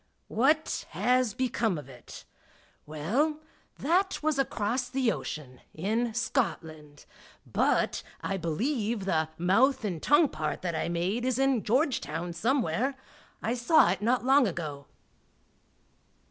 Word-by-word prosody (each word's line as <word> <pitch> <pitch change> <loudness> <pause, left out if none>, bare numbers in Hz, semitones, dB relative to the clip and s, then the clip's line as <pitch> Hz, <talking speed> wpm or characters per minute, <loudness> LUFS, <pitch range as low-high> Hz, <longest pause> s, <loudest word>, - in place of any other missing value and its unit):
What 300 +8 +1
has 250 -3 +2
become 235 -7 0
of 145 - -8
It? 125 -3 -12 0.6
Well, 235 - 0 0.4
that 360 +4 +1
was 310 -2 +1
across 245 -1 -1
the 260 -4 +1
ocean, 130 -10 -6
in 220 +7 -1
Scotland, 155 - -3 0.4
but - - +1 0.2
I 195 - -2
believe 210 - -1
the 160 -4 +1
mouth 225 +9 +3
and 175 -6 -3
tongue 295 +1 +4
part 155 +2 -4
that 175 -2 -1
I 160 +1 -2
made 180 +7 -1
is 255 -1 0
in 270 -3 +2
Georgetown 200 - 0
somewhere; 245 - 0 0.5
I 225 - 0
saw 245 - +4
it 190 - -3
not 245 +3 +1
long 270 -1 +5
ago. 150 -6 -5
225 Hz, 125 wpm, -28 LUFS, 170-265 Hz, 0.6 s, long